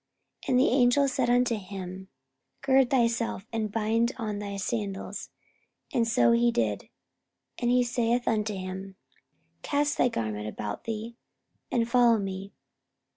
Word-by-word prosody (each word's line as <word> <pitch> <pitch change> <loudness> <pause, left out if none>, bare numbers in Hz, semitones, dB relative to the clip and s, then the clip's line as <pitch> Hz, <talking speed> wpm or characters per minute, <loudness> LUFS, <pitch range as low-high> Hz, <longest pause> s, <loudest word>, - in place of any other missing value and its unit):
44:012:008 - - -6
And 250 -1 +4
the 260 - +4
angel 255 +2 +4
said 260 -2 0
unto 245 -1 +3
him, 190 -1 -7 0.6
Gird 265 -2 +4
thyself, 230 -5 +1
and 220 -2 -1
bind 225 +2 +1
on 215 -4 -3
thy 200 -1 -5
sandals. 200 -1 -4 0.6
And 230 -1 +2
so 120 - +4
he 120 0 +4
did. 105 -4 -1 0.7
And 240 - 0
he 250 0 +4
saith 240 0 0
unto 215 -2 0
him, 190 +1 -6 0.7
Cast 290 0 0
thy 245 - +4
garment 105 - -3
about 105 -1 -5
thee, 230 +1 -5 0.5
and 230 -2 +1
follow 240 -1 +5
me. 195 -1 -5
225 Hz, 140 wpm, -28 LUFS, 190-245 Hz, 0.7 s, follow